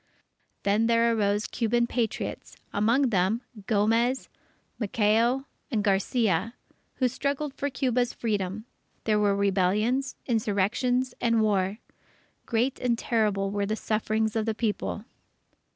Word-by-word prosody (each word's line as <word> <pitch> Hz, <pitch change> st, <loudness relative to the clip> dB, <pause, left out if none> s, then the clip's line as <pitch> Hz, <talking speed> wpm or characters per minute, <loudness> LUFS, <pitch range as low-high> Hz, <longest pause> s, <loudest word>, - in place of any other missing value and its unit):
Then 210 Hz, +3 st, +2 dB
there 230 Hz, 0 st, +3 dB
arose 205 Hz, 0 st, +1 dB
Cuban 235 Hz, 0 st, +1 dB
Patriots, 235 Hz, -2 st, -3 dB, 0.2 s
among 235 Hz, +5 st, +2 dB
them, 195 Hz, +4 st, +2 dB, 0.3 s
Gomez, 230 Hz, +4 st, +2 dB, 0.5 s
Maceo, 230 Hz, +4 st, +2 dB, 0.2 s
and 220 Hz, -7 st, 0 dB
Garcia, 200 Hz, +1 st, +1 dB, 0.4 s
who 255 Hz, -, +2 dB
struggled 280 Hz, +3 st, -2 dB
for 285 Hz, -, -2 dB
Cuba's 250 Hz, -2 st, 0 dB
Freedom. 205 Hz, -1 st, -2 dB, 0.4 s
There 215 Hz, -1 st, +2 dB
were 205 Hz, -1 st, +3 dB
rebellions, 205 Hz, +7 st, +1 dB
insurrections, 235 Hz, +3 st, +1 dB
and 230 Hz, -2 st, +3 dB
war. 200 Hz, -1 st, +1 dB, 0.7 s
Great 245 Hz, +3 st, 0 dB
and 240 Hz, -2 st, +1 dB
terrible 210 Hz, -4 st, 0 dB
were 200 Hz, 0 st, -1 dB
the 215 Hz, -, 0 dB
sufferings 220 Hz, 0 st, -1 dB
of 220 Hz, 0 st, 0 dB
the 220 Hz, -, 0 dB
People. 215 Hz, -1 st, -2 dB
225 Hz, 120 wpm, -27 LUFS, 205-240 Hz, 0.7 s, there